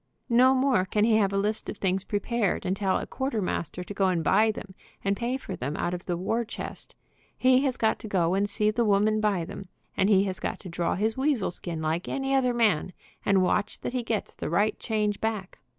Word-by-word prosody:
No 255 +3 +6
more 255 -8 +2
can 210 +2 +1
he 220 0 +4
have 200 -3 +2
a 195 - 0
list 210 +2 -1
of - - -5
things 190 -1 0
prepared, 210 0 -1
and 185 +1 0
tell 195 -1 +1
a - - -4
quarter 265 -4 -2
master 180 -2 -3
to 205 - -7
go 195 -1 +2
and 175 -3 +1
buy 220 +8 +4
them, 200 -3 -6 0.3
and 200 0 +2
pay 240 +4 -1
for 195 -8 -6
them 145 -1 -4
out 175 - -1
of 175 0 -6
the 175 -2 -1
war 225 +6 0
chest. 225 - -8 0.4
He 255 +1 +4
has 260 -2 0
got 220 -1 +1
to - - -8
go 180 -4 +1
and 200 +1 +1
see 210 +1 +1
the 235 +2 +1
woman 215 +1 +3
buy 200 -6 +1
them, 195 - -8 0.3
and 195 - +2
he 195 -2 +5
has 190 -2 -2
got - - -3
to 185 - -8
draw 170 0 -1
his 220 +4 0
weasel 265 -8 +1
skin 170 -2 -5
like 160 +3 -1
any 270 0 -1
other 260 -2 +3
man, 210 -7 +1 0.3
and 195 -2 +3
watch 205 +3 0
that - - -4
he 255 - 0
gets 225 -3 -3
the - - -5
right 205 +6 +1
change 210 -2 -1
back. 215 -4 -3
205 Hz, 235 wpm, -27 LUFS, 185-230 Hz, 0.4 s, No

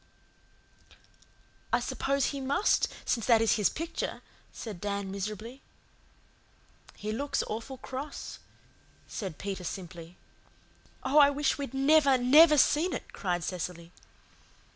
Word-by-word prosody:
"I - - +3
suppose 275 0 0
He 280 - -4
must, 280 +10 +2 0.2
since 230 -3 -1
that 230 -3 +6
is 225 0 +3
His 210 - +3
picture," 330 +2 -4 0.3
said 210 -7 -8
Dan 200 -1 -3
miserably. 215 +6 -6 1.4
"He 210 +1 -4
looks 275 +6 -1
awful 230 +5 -6
cross," 265 +3 -7 0.7
said 190 -7 -6
Peter 195 -2 -5
simply. 175 -1 -7 0.9
"Oh, 275 +3 +4
I 285 -1 +8
wish 285 0 0
we'd 275 -1 -5
never, 280 0 +5
never 300 +5 +7
seen 315 +6 +3
it," - - -6
cried 175 -3 -2
Cecily. 175 -1 -5
240 Hz, 120 wpm, -29 LUFS, 195-280 Hz, 1.4 s, I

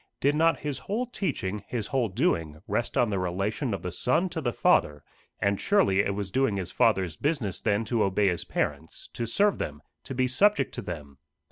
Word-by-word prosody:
Did 140 +2 +3
not 165 +2 +3
his 145 -2 -3
whole 225 +5 -2
teaching, 135 - -3
his 115 -4 -3
whole 125 -3 0
doing, 85 - 0
rest 120 - -1
on 120 -3 +3
the 100 - 0
relation 100 - -1
of 100 -4 -3
the 90 - -3
Son 165 - +1
to 165 - -4
the 120 -4 0
Father 75 -8 +2 0.4
and 100 0 0
surely 195 - +3
it 100 -1 +1
was 100 -2 -4
doing 130 -3 +1
his 90 -2 -3
Father's 95 -7 +2
business 140 - -1
then 105 +2 +1
to 115 -1 0
obey 100 +1 +2
his 90 - -2
parents 80 - -3
to 115 - -3
serve 200 - +2
them, 75 0 -4 0.3
to 135 - -6
be 130 0 +2
subject 205 +12 +3
to - - -4
them. 75 -6 -8
110 Hz, 205 wpm, -27 LUFS, 95-140 Hz, 0.4 s, Did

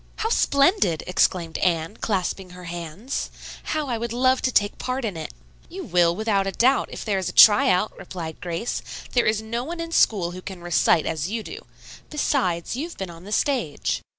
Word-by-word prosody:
"How 445 - -2
splendid!" 280 - +3
exclaimed 175 -2 +1
Anne, 165 +1 0
clasping 190 -2 -2
her 180 - -10
hands. 175 - -5 0.4
"How 305 -2 -2
I 235 -3 -2
would 235 0 -3
love 255 +1 +3
to 255 - +1
take 205 -3 +1
part 255 0 -2
in 205 -5 -3
it!" 160 - -6 0.4
"You - - -7
will, 170 -1 +3
without 200 -2 0
doubt, 260 +3 +3
if - - -7
there 200 -3 0
is 185 - -2
a - - -5
try 210 -1 +7
out," 185 +4 +1
replied 170 -4 -7
Grace. 175 +6 -3 0.3
"There 240 - +2
is 215 0 +1
no 235 +2 -3
one 335 +5 -6
in 335 0 -4
school 190 - +3
who 185 +1 -8
can 185 -2 -8
recite 170 -2 +3
as 160 +1 -2
you 225 +1 -3
do; 425 - -9 0.4
besides, 235 - 0
you 290 +6 -3
have 345 - -12
been 190 -3 -5
on 170 +2 -13
the 205 - -9
stage." 215 - 0
200 Hz, 200 wpm, -24 LUFS, 175-255 Hz, 0.4 s, try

